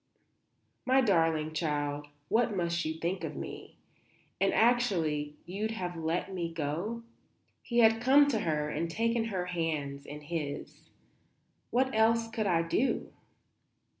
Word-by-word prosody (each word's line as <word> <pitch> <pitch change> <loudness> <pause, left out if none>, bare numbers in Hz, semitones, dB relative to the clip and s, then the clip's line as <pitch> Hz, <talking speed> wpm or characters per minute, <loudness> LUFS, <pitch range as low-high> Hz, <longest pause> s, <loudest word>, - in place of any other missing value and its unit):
"My 260 +1 +4
darling 165 -7 +2
child, 145 -2 -2 0.2
what 225 0 +2
must 170 -1 0
you 160 0 -2
think 170 +4 -2
of - - -4
me? - - -8 0.6
And, - - +3
actually, 170 -12 +2
you'd 200 +5 -3
have 180 -6 -4
let 165 +4 -2
me 170 -2 -3
go?" 170 +9 -3 0.6
He 235 - -3
had 225 0 +5
come 280 +3 +6
to 230 -6 +1
her 150 -5 0
and 160 +3 -2
taken 230 +5 0
her 190 -5 -2
hands 155 -5 -3
in 150 +1 -7
his. 150 -2 -5 0.8
"What 260 +2 +1
else 225 +1 +3
could 220 -2 -1
I 170 -3 +3
do?" 235 +10 0
175 Hz, 135 wpm, -30 LUFS, 155-225 Hz, 0.8 s, come